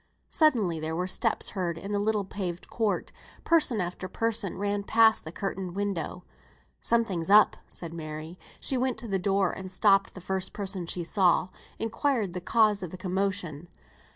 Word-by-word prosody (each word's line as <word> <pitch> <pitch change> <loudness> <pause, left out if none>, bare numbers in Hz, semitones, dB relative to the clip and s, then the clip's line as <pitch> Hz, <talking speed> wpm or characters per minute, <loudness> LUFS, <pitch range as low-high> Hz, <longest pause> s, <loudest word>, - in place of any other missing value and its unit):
Suddenly 225 - +3
there 160 +1 -3
were 180 +2 -1
steps 220 +4 0
heard 175 -4 -2
in 195 +4 -6
the 205 - +1
little 210 -1 +1
paved 180 -3 -5
court; 220 -3 -1 0.3
person 300 -9 +3
after 180 +1 -3
person 225 -2 -1
ran 205 +1 -1
past 220 0 +4
the 160 - -6
curtained 190 -1 -4
window. 195 -3 -3 0.6
"Something's 200 -8 +1
up," 210 +1 +7
said 170 -2 -8
Mary. 155 +1 -7 0.2
She 265 - +1
went 255 -1 0
to 240 - -4
the 195 -2 0
door 195 0 +2
and 190 -1 -7
stopping 195 0 +3
the - - -7
first 190 +1 -3
person 190 -4 -2
she 175 0 -1
saw, 180 +1 +3 0.3
inquired 225 -3 0
the 180 - -4
cause 215 +1 +3
of 180 - -4
the 185 - -8
commotion. 185 -4 -2
195 Hz, 170 wpm, -28 LUFS, 180-215 Hz, 0.6 s, up